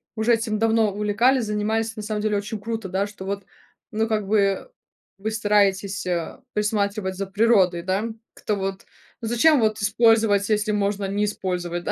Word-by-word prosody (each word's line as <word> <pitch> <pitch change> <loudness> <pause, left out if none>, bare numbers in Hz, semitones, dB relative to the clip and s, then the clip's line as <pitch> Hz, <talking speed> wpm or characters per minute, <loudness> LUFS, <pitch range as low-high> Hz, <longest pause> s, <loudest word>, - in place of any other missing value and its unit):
уже 220 +2 +2
этим 220 -2 -1
давно 225 -1 +3
увлекались, 220 +5 +2
занимались. 220 +2 -1
На 215 - -6
самом 210 0 -3
деле, 210 -1 +1
очень 210 +2 -4
круто, 220 -2 -4
да, 195 +2 0
что 205 -2 -10
вот, 200 0 -4 0.5
ну, 220 +1 0
как 215 -3 -1
бы 200 - +1 0.5
вы 215 +3 -3
стараетесь, 200 -2 +1
э, 175 -2 -3
присматривать 205 -2 -1
за 195 +1 -3
природой, 195 -4 +3
да, 190 +4 -1 0.3
как-то 210 - -2
вот. 195 -1 -4 0.4
Ну 225 - -4
зачем 280 +6 +4
вот 215 -1 +2
использовать, 215 -1 +3
если 210 0 +1
можно 205 -1 0
не 205 +2 0
использовать, 180 -4 -3
да? - - -1
210 Hz, 170 wpm, -23 LUFS, 195-220 Hz, 0.5 s, зачем